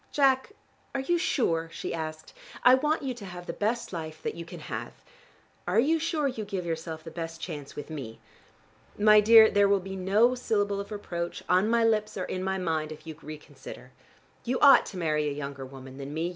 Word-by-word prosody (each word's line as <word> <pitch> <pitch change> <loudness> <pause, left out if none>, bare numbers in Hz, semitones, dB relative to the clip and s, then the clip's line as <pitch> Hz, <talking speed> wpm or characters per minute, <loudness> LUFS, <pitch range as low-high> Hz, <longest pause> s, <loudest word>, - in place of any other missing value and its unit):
"Jack, 270 +5 +2 0.4
are 270 - 0
you 345 +6 +1
sure?" 165 - 0
she - - -5
asked. 155 -1 -6 0.3
"I 250 - +8
want 300 +4 +2
you 265 -2 -2
to 230 -4 -10
have 180 -1 -8
the 170 - -4
best 215 +2 -2
life 155 -2 -6
that - - -2
you 170 - -8
can - - -10
have. - - -6 0.7
Are 185 +5 +3
you 315 +7 +3
sure 315 -2 0
you 250 -5 -3
give 195 -3 -4
yourself 160 -1 -4
the 165 - -9
best 165 0 -6
chance 150 -4 -7
with 145 +2 -7
me? 130 -7 -6 0.8
My 210 0 +7
dear, 220 +1 +8
there 200 -1 +4
will 200 0 +4
be 190 +1 -7
no 200 +6 +3
syllable 205 -5 0
of 200 +2 -7
reproach, 175 -4 -5
on 185 +4 +3
my 235 0 +3
lips 215 -2 +1
or 185 - -2
in 185 - -4
my 190 0 -1
mind, 160 -4 -2
if 155 - -10
you 160 -1 -7
reconsider. 155 0 -10 0.5
You 250 +2 -1
ought 280 -1 +7
to 190 - -8
marry 155 -3 0
a - - -3
younger 140 -2 -6
woman 135 0 -11
than 140 +2 -6
me. 165 +2 -1
185 Hz, 210 wpm, -28 LUFS, 160-225 Hz, 0.8 s, I